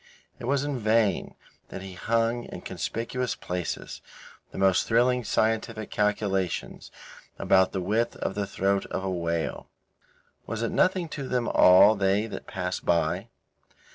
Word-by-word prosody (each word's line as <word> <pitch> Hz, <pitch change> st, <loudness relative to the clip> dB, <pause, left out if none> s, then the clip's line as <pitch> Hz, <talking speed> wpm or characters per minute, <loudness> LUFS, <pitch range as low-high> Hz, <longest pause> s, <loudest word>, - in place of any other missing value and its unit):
It -, -, -6 dB
was 140 Hz, +2 st, +1 dB
in 145 Hz, -3 st, -2 dB
vain 110 Hz, -3 st, +1 dB, 0.3 s
that 95 Hz, -, -7 dB
he 95 Hz, -1 st, -8 dB
hung 115 Hz, +4 st, 0 dB
in -, -, -9 dB
conspicuous 125 Hz, +2 st, -3 dB
places 90 Hz, -1 st, -5 dB, 0.5 s
the -, -, -11 dB
most 95 Hz, -1 st, +3 dB
thrilling 125 Hz, +2 st, +3 dB
scientific 110 Hz, 0 st, -1 dB
calculations 100 Hz, -3 st, -1 dB, 0.5 s
about 95 Hz, -1 st, +3 dB
the 95 Hz, -, -2 dB
width 110 Hz, +6 st, 0 dB
of -, -, -3 dB
the 100 Hz, -1 st, -2 dB
throat 100 Hz, 0 st, 0 dB
of 95 Hz, -, -4 dB
a 95 Hz, -, -2 dB
whale. 85 Hz, -5 st, -3 dB, 0.8 s
Was 115 Hz, +1 st, -3 dB
it 115 Hz, -, -1 dB
nothing 185 Hz, -2 st, +2 dB
to 140 Hz, -3 st, -5 dB
them 125 Hz, -2 st, -1 dB
all 95 Hz, +4 st, +7 dB
they 100 Hz, +1 st, +1 dB
that 115 Hz, -, -8 dB
passed 90 Hz, -3 st, -4 dB
by? 85 Hz, +4 st, +1 dB
105 Hz, 145 wpm, -26 LUFS, 95-115 Hz, 0.8 s, all